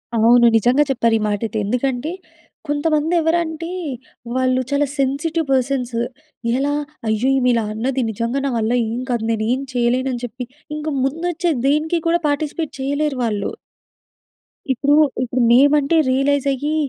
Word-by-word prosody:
అవును 235 Hz, +2 st, +5 dB
నిజంగా 245 Hz, +6 st, +3 dB
చెప్పారు 230 Hz, -3 st, +2 dB
ఈ -, -, -4 dB
మాటైతే. 215 Hz, +2 st, -2 dB
ఎందుకంటే 250 Hz, +6 st, -1 dB, 0.6 s
కొంతమంది 300 Hz, +2 st, 0 dB
ఎవరు 325 Hz, +2 st, +2 dB
అంటే 320 Hz, +1 st, -6 dB, 0.7 s
వాళ్ళు 255 Hz, 0 st, +2 dB
చాలా 285 Hz, +1 st, +2 dB
సెన్సిటివ్ 295 Hz, +5 st, 0 dB
పర్సన్సు 255 Hz, -2 st, 0 dB, 0.6 s
ఎలా? 285 Hz, +2 st, 0 dB, 0.3 s
అయ్యో! 220 Hz, +3 st, +1 dB
ఈమె 250 Hz, -1 st, +2 dB
ఇలా 230 Hz, -1 st, +1 dB
అన్నది 255 Hz, +4 st, -1 dB
నిజంగా 230 Hz, +5 st, -2 dB
నా -, -, +1 dB
వల్ల 220 Hz, 0 st, 0 dB, 0.2 s
ఏం 235 Hz, -, -3 dB
కాదు. 240 Hz, -2 st, -1 dB
నేనేం 225 Hz, +4 st, 0 dB
చేయలేను 250 Hz, +2 st, +1 dB
అని 245 Hz, 0 st, -5 dB
చెప్పి 250 Hz, +2 st, -7 dB, 0.3 s
ఇంక 305 Hz, +1 st, -6 dB, 0.2 s
ముందు 305 Hz, +6 st, -2 dB
వచ్చే 345 Hz, +1 st, 0 dB, 0.2 s
దేనికి 310 Hz, +4 st, +1 dB
కూడా 340 Hz, +1 st, +3 dB
పార్టిసిపేట్ 305 Hz, +2 st, -2 dB
చేయలేరు 285 Hz, 0 st, -1 dB
వాళ్ళు. 210 Hz, -3 st, -1 dB, 1.2 s
ఇప్పుడు 280 Hz, +3 st, +1 dB, 0.3 s
ఇప్పుడు 250 Hz, 0 st, -1 dB
మేమంటే 285 Hz, +4 st, +4 dB
రియలైజ్ 275 Hz, +1 st, +1 dB
అయ్యి 290 Hz, +4 st, -2 dB
265 Hz, 140 wpm, -20 LUFS, 240-295 Hz, 1.2 s, అవును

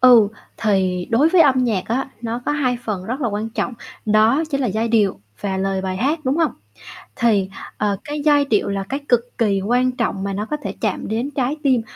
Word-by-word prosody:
Ừ, 240 Hz, -5 st, +7 dB, 0.3 s
thì 185 Hz, -4 st, +1 dB
đối 255 Hz, +7 st, +4 dB
với 360 Hz, +1 st, +4 dB
âm 270 Hz, -4 st, +4 dB
nhạc 210 Hz, -6 st, 0 dB
á, 260 Hz, +4 st, -1 dB
nó 235 Hz, +1 st, -3 dB
có -, -, +2 dB
hai 260 Hz, -4 st, +1 dB
phần 200 Hz, -4 st, -3 dB
rất 250 Hz, +7 st, -4 dB
là 245 Hz, -, +1 dB
quan 210 Hz, +1 st, -3 dB
trọng, 230 Hz, +1 st, -2 dB, 0.3 s
đó 220 Hz, +7 st, +4 dB
chính 275 Hz, -2 st, 0 dB
là 260 Hz, -, +1 dB
giai 220 Hz, +2 st, -1 dB
điệu 210 Hz, -, +2 dB, 0.2 s
và 195 Hz, -2 st, -2 dB
lời 195 Hz, 0 st, -1 dB
bài 185 Hz, -1 st, -2 dB
hát, 285 Hz, -, +1 dB
đúng 265 Hz, +2 st, +1 dB
hông? 325 Hz, -3 st, +2 dB, 0.6 s
Thì, 205 Hz, -5 st, +2 dB, 0.3 s
ờ, 205 Hz, -1 st, 0 dB
cái 295 Hz, 0 st, -4 dB
giai 290 Hz, -2 st, +5 dB
điệu 220 Hz, -8 st, +1 dB
là 200 Hz, -1 st, -1 dB
cái 275 Hz, +2 st, -2 dB
cực 245 Hz, -2 st, +5 dB, 0.2 s
kỳ 200 Hz, -4 st, +2 dB
quan 250 Hz, +5 st, +2 dB
trọng 230 Hz, -6 st, -2 dB
mà 200 Hz, -, -2 dB
nó 205 Hz, +2 st, -3 dB
có 300 Hz, -, 0 dB
thể -, -, -4 dB
chạm 215 Hz, -4 st, -2 dB
đến 230 Hz, +6 st, -1 dB
trái 270 Hz, +1 st, -1 dB
tim 260 Hz, -5 st, +3 dB
230 Hz, 225 wpm, -20 LUFS, 200-265 Hz, 0.6 s, Ừ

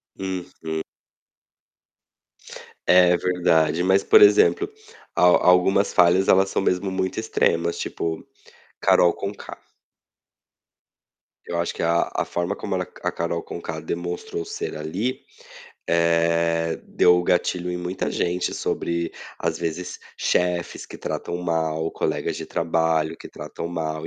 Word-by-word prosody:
Uhum. 90 Hz, -4 st, -5 dB, 2.1 s
É 90 Hz, -1 st, +6 dB
verdade, 85 Hz, -2 st, +2 dB
mas, 95 Hz, +1 st, +4 dB
por 440 Hz, -, +6 dB
exemplo, 425 Hz, +1 st, +5 dB, 0.4 s
al 90 Hz, 0 st, +5 dB
algumas 95 Hz, +2 st, +4 dB
falhas 90 Hz, +2 st, +4 dB
elas 95 Hz, +1 st, +5 dB
são -, -, -1 dB
mesmo 95 Hz, +1 st, 0 dB
muito 95 Hz, +2 st, -2 dB
extremas 85 Hz, -6 st, 0 dB
tipo, 80 Hz, -1 st, -4 dB, 0.5 s
Carol 85 Hz, -1 st, +4 dB
Conká. 100 Hz, +1 st, -7 dB, 1.9 s
Eu 85 Hz, -, -3 dB
acho 85 Hz, -, -1 dB
que -, -, -6 dB
a 85 Hz, +1 st, +2 dB
a -, -, 0 dB
forma 85 Hz, +3 st, -2 dB
como 100 Hz, -2 st, -4 dB
ela 90 Hz, -, -1 dB, 0.2 s
a -, -, 0 dB
Carol 85 Hz, 0 st, -2 dB
Conká 80 Hz, -2 st, -6 dB
demonstrou 85 Hz, +1 st, -4 dB
ser -, -, -5 dB
ali, 95 Hz, +12 st, -3 dB, 0.7 s
eh, 85 Hz, 0 st, +2 dB
deu 90 Hz, 0 st, +4 dB
o 90 Hz, -, +1 dB
gatilho 90 Hz, 0 st, 0 dB
em 90 Hz, -, -2 dB
muita 90 Hz, +2 st, -3 dB
gente 90 Hz, +1 st, -1 dB
sobre 85 Hz, 0 st, -2 dB, 0.3 s
às -, -, -2 dB
vezes 85 Hz, +2 st, -4 dB, 0.2 s
chefes 90 Hz, -1 st, -1 dB
que -, -, -11 dB
tratam 85 Hz, -, -4 dB
mal, 80 Hz, -2 st, -1 dB
colegas -, -, -2 dB
de -, -, -5 dB
trabalho 80 Hz, -1 st, 0 dB
que -, -, -11 dB
tratam -, -, -7 dB
mal. 80 Hz, -2 st, -4 dB
85 Hz, 125 wpm, -23 LUFS, 85-90 Hz, 2.1 s, É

